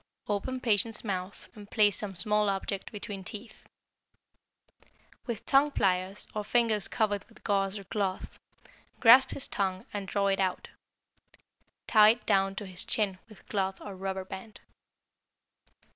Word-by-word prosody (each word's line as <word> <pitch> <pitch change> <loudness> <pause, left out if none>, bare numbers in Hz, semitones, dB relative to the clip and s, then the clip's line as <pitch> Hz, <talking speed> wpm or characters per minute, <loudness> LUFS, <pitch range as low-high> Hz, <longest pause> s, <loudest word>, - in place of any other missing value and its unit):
Open 210 +6 -2
patient's 225 -2 +1
mouth 190 -2 -4
and 205 -3 -12
place 210 -3 +3
some 200 -3 -5
small 210 +3 +1
object 195 0 -3
between 205 -2 -7
teeth. 215 +4 -10 1.6
With 230 -3 -4
tongue 280 +2 +4
pliers 190 -5 0
or 210 - -2
fingers 220 -2 +2
covered 205 -3 0
with 230 - -20
gauze 195 -1 0
or 200 - -8
cloth, 195 -1 -3 0.6
grasp 255 +3 +8
his 275 - -3
tongue 190 -2 -2
and 200 -2 -4
draw 200 +1 0
it 195 -1 +1
out. 185 -2 -1 1.2
Tie 215 -1 +7
it 235 +2 +1
down 195 -2 +2
to 205 - -5
his 185 -1 -4
chin 195 -4 -1
with 215 - -17
cloth 195 -2 -1
or 200 -2 -8
rubber 190 0 -4
band. 190 +3 -9
205 Hz, 145 wpm, -29 LUFS, 195-215 Hz, 1.6 s, grasp